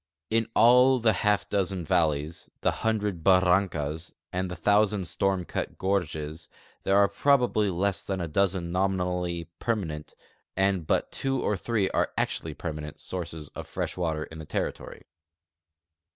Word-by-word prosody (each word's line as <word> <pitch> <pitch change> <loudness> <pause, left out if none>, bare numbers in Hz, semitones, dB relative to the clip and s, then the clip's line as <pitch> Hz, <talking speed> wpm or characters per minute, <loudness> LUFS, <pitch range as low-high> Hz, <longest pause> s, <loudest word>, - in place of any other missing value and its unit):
In 115 0 +2
all 125 +3 +6
the 115 -2 +3
half 105 +2 +1
dozen 95 -3 -1
valle3''S, 80 -3 0
the - - +3
hundred 105 -6 -1
barrancas, 90 -4 +2 0.2
and 90 0 -1
the 90 - -5
thousand 100 +1 +2
storm 90 +2 0
cut - - -4
gorges, 80 -5 -2 0.3
there 95 - +2
are 100 0 +6
probably 120 -1 +2
less 95 +2 -1
than 95 -1 -3
a 85 - -2
dozen 90 +1 0
nominally 90 -2 -1
perma 110 -5 0
nent, 75 -1 -7 0.4
and 95 -4 +1
but - - +1
two 135 -1 -1
or 105 - +1
three 105 0 0 0.3
actually - - -1
permanent, 75 -2 -6
sources 80 -5 -5
of - - -8
fresh - - -3
water 80 -3 -1
in 80 0 -10
the 80 - -7
territory. - - -4
95 Hz, 145 wpm, -27 LUFS, 85-100 Hz, 0.4 s, all